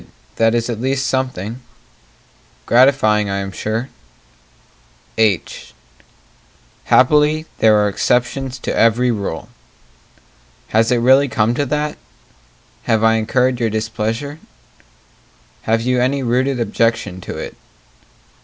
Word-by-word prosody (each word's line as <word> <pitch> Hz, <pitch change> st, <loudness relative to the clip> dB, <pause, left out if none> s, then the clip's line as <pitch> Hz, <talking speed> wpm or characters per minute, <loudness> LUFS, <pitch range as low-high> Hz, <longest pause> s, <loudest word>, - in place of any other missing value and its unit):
that 115 Hz, 0 st, +3 dB
is 115 Hz, -1 st, 0 dB
at 115 Hz, -2 st, -4 dB
least 135 Hz, +1 st, -1 dB
something 130 Hz, -3 st, -3 dB, 1.0 s
Gratifying, 115 Hz, -5 st, +3 dB
I 100 Hz, -, -2 dB
am 100 Hz, 0 st, -4 dB
sure 110 Hz, +6 st, -3 dB, 1.3 s
H 110 Hz, -5 st, -1 dB, 1.1 s
Happily 150 Hz, +3 st, +3 dB
there 110 Hz, -1 st, +5 dB
are 105 Hz, 0 st, +2 dB
exceptions 125 Hz, +5 st, -1 dB
to -, -, -4 dB
every 120 Hz, +2 st, +3 dB
rule 100 Hz, -7 st, -4 dB, 1.2 s
Has 110 Hz, +2 st, +2 dB
it 125 Hz, -, +3 dB
really 130 Hz, +4 st, +4 dB
come 115 Hz, -4 st, +1 dB
to 140 Hz, +3 st, -1 dB
that? 150 Hz, +2 st, -2 dB, 0.9 s
Have 110 Hz, -1 st, +1 dB
I 110 Hz, 0 st, +5 dB
incurred 125 Hz, +3 st, +1 dB
your 115 Hz, -2 st, 0 dB
displeasure? 110 Hz, +6 st, -3 dB, 1.3 s
Have 115 Hz, 0 st, +2 dB
you 125 Hz, 0 st, +1 dB
any 135 Hz, +2 st, 0 dB
rooted 130 Hz, +2 st, 0 dB
objection 115 Hz, -5 st, -1 dB
to -, -, -7 dB
it? -, -, -7 dB
120 Hz, 115 wpm, -18 LUFS, 110-130 Hz, 1.3 s, there